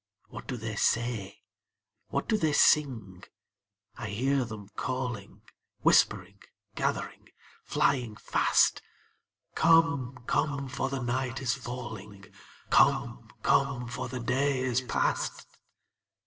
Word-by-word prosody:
What - - -9
do 125 - -3
they 110 -2 -5
say? 115 -5 -1 0.6
What - - -2
do 220 - +2
they 160 -7 +1
sing? 110 -13 +2 0.7
I 110 - -6
hear 130 +6 +1
them 105 -3 -9
calling, 125 -2 -5 0.4
Whispering, - - +3 0.3
gathering, - - -3 0.4
flying 120 -5 +1
fast, - - +2 0.7
'Come, 140 -7 +3
come, 140 -1 0
for 135 0 -2
the 135 -1 -3
night 125 +1 -2
is 130 -2 0
falling; 110 -6 -7 0.5
Come, - - +3
come, 135 -3 +2
for 125 +1 -4
the 125 0 -5
day 130 +3 0
is 130 -1 +1
past!' 125 - -1
125 Hz, 110 wpm, -29 LUFS, 115-135 Hz, 0.7 s, Whispering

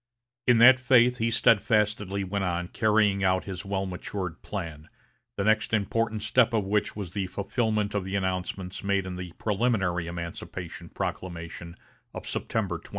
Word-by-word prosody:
In 125 -1 +6
that 125 +3 +8
faith 125 -1 +4
he 115 +1 +1
steadfastly 105 -3 +2
went 95 +1 -2
on 90 -1 -2
carrying 105 -3 +2
out 95 0 +2
his 95 -2 -6
well 100 -1 -2
matured 90 -1 -5
plan, 80 -6 -6 0.5
the 100 - 0
next 110 +1 +2
important 110 +1 -1
step 115 +1 +3
of 110 -3 +1
which 105 +1 0
was 100 -5 -5
the 95 -1 -2
fulfilment 105 +2 -1
of 100 -2 -1
the 95 +1 -4
announcements 95 0 -3
made 100 -1 +1
in 95 -1 -5
the 90 -1 -6
preliminary 95 -6 0
emancipation 85 0 -6
proclamation 85 -1 -5 0.4
of - - -7
September - - -2
22. - - -16
100 Hz, 155 wpm, -27 LUFS, 90-110 Hz, 0.5 s, that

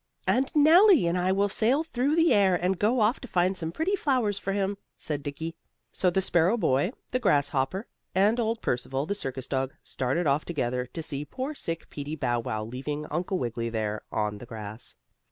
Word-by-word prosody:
"And 240 +8 +2
Nellie 330 - +7
and 170 +1 +1
I 180 +1 +1
will 200 +1 +2
sail 245 +9 +2
through 285 -1 0
the 330 0 +4
air, 195 -3 +4
and 180 +1 0
go 225 +3 +2
off 215 +5 +3
to 250 - -9
find 185 -1 +1
some 165 -3 -3
pretty 340 - 0
flowers 250 - 0
for 195 - -3
him," 200 0 -1 0.2
said 150 -2 -4
Dickie. 160 +4 -5 0.4
So 185 - +1
the 190 +2 0
sparrow 175 +5 +3
boy, 145 - +1 0.2
the 255 - +1
grasshopper 145 - +1 0.3
and 210 +5 +3
old 225 0 -1
Percival, 135 +3 -1
the 200 - -1
circus 130 -9 -4
dog, 135 0 -2
started 135 +7 -1
off 145 +1 +2
together 125 -6 -2
to 165 +5 -6
see 145 -2 -3
poor 260 - -5
sick 165 - -4
Peetie 145 +1 -5
Bow 120 -5 0
Wow, 110 -2 -3
leaving 140 +6 -4
Uncle 175 +4 -1
Wiggily 115 -3 -2
there 110 -2 -2
on 105 -1 -1
the 120 - -10
grass. 110 0 -7
175 Hz, 195 wpm, -27 LUFS, 135-215 Hz, 0.4 s, Nellie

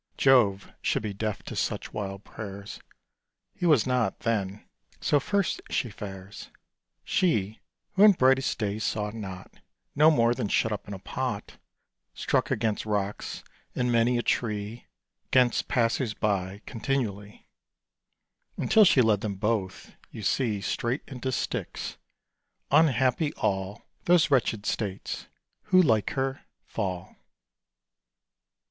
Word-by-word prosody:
Jove 115 -8 +4
should - - 0
be 105 -2 -3
deaf 105 0 -3
to - - -7
such - - -2
wild 100 -1 -5
prayers: 100 -2 -8 0.7
He 175 - -1
was 145 -9 +5
not 125 -5 0
then; 105 -3 -2 0.3
so 145 - +3
first 200 +6 0
she 120 - -1
fares; 95 -1 -9 0.5
She, 110 - +1 0.3
who 195 - +1
in 210 - +8
brightest 135 -4 +3
day 105 -1 -2
saw 105 -1 -1
not, 95 -4 -8 0.4
No 150 +2 +7
more 120 -6 +4
than 120 -4 -2
shut 110 +2 +1
up 105 - -4
in 100 - -5
a - - -6
pot, 120 +2 -4 0.6
Struck - - 0
against 110 -2 0
rocks, 105 -1 -3 0.3
and 125 -1 +1
many 120 +1 +3
a 120 - -1
tree 105 0 -2 0.4
'Gainst 125 -2 +3
passers 120 -2 +1
by, 100 -1 -1
continually; 110 -5 -3 1.1
Until 220 -1 +5
she 135 -8 +5
led 105 -3 +3
them 105 -2 -3
both, 105 -2 -2
you 110 - -9
see, 110 -2 0
Straight 120 +6 -2
into 130 -1 -4
Styx. 120 - -3 0.7
Unhappy 135 0 +3
all 95 +2 -2 0.2
Those 170 -3 +4
wretched 115 -5 +2
states 100 -3 -3 0.4
who, 185 - +5
like 110 - +3
her, 135 +1 -1 0.2
fall. 95 -4 -4
110 Hz, 125 wpm, -27 LUFS, 100-130 Hz, 1.1 s, in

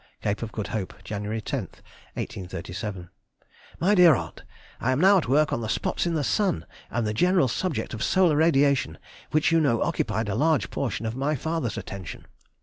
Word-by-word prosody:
CAPE 100 - -1
OF 115 -2 -4
GOOD 105 -3 -4
HOPE, 105 -5 -3
Jan. 105 -1 -5
10, - - -4
1837. 95 -3 -6 0.7
MY 190 +5 +3
DEAR 175 -6 +7
AUNT,— - - -6 0.4
I 130 - 0
am 130 - 0
now 195 +3 +6
at 165 - -4
work 150 +3 +3
on - - -1
the 110 - -4
spots 145 - -1
in 170 - 0
the 150 - 0
sun, 165 - 0 0.2
and 120 0 -1
the 105 - -1
general 180 - +3
subject 155 +6 -2
of 110 - -5
solar 185 -5 +3
radiation, 145 -4 +3 0.3
which 155 +2 +2
you 165 - +4
know 115 -7 +2
occupied 110 0 -1
a 100 - -1
large 155 +6 +1
portion 115 -4 -2
of 110 +1 -3
my 140 +4 0
father's 145 -6 -2
attention. 95 -4 -7
130 Hz, 185 wpm, -26 LUFS, 105-160 Hz, 0.7 s, DEAR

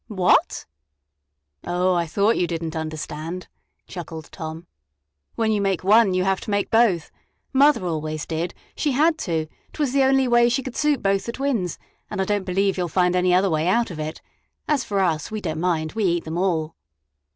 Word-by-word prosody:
"What!" 185 -5 +2 1.0
"Oh, 180 +1 +1
I 170 -1 0
thought 200 +7 +2
you 175 - +1
didn't 165 -1 -4
understand," 160 +2 -5 0.4
chuckled 165 -3 -8
Tom. 160 0 -7 0.7
"When 225 -1 +1
you 210 -2 +1
make 195 -3 0
one, 205 -1 +5
you 185 - +2
have 190 0 0
to - - -8
make 200 -1 0
both. 225 -8 +3 0.4
Mother 275 -6 +4
always 155 -2 -3
did 165 +2 -3 0.2
she 295 -3 0
had 315 +4 +3
to; 165 - -1
't 155 - -21
was 280 -4 0
the 275 - +3
only 265 0 +3
way 240 0 +4
she 255 +2 0
could 255 -1 -7
suit 300 -3 +1
both 195 +1 +1
the - - -1
twins, 240 - -1 0.3
and - - -5
I 190 - +1
don't 205 -1 -1
believe 195 +1 +1
you 180 - +1
'll - - -3
find 180 +1 +2
any 180 0 +2
other 185 +1 +3
way 155 +1 0
out 230 +3 +2
of 160 - -7
it. 155 +1 -5 0.4
As 290 -5 +1
for 200 -3 -1
us 160 -5 0
we 215 - -4
don't 160 -5 -3
mind; 160 -3 0
we 220 -2 -1
eat 170 -2 +1
them 160 +2 -4
all!" 165 -4 0
185 Hz, 200 wpm, -23 LUFS, 165-225 Hz, 1.0 s, one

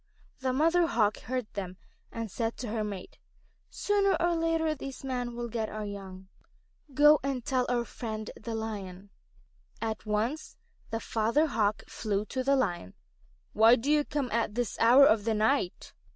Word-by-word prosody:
The 260 -1 0
Mother 330 +6 +3
Hawk 215 -7 +1
heard 255 -1 -3
them, 185 -3 -5 0.3
and 230 -3 -5
said 225 +1 -2
to 245 - -5
her 215 0 -1
mate: 200 -3 -7 0.5
"Sooner 405 -1 +1
or 345 0 +2
later 325 -1 +1
these 275 -2 -8
men 245 -2 -3
will 240 0 -4
get 220 -1 -3
our 215 0 -5
young. 190 -2 -8 0.6
Do 280 - -20
go 295 +1 +7
and 270 -3 -3
tell 255 -2 +1
our 240 -1 0
friend 220 -2 -6
the 225 +1 -6
Lion." 200 -3 -6 0.7
At 220 -1 -4
once 225 +9 -2 0.3
the 225 - -2
Father 230 +8 +1
Hawk 215 -8 0
flew 210 -1 -2
to 260 -1 -1
the 275 +1 +3
Lion. 175 - -1 0.6
"Why 225 +3 +7
do 255 +5 -1
you 300 -1 +4
come 285 -4 -3
at 225 -2 0
this 245 -2 -1
hour 250 +5 +7
of 215 -5 +4
the 225 0 0
night?" 215 -3 0
230 Hz, 170 wpm, -29 LUFS, 215-275 Hz, 0.7 s, go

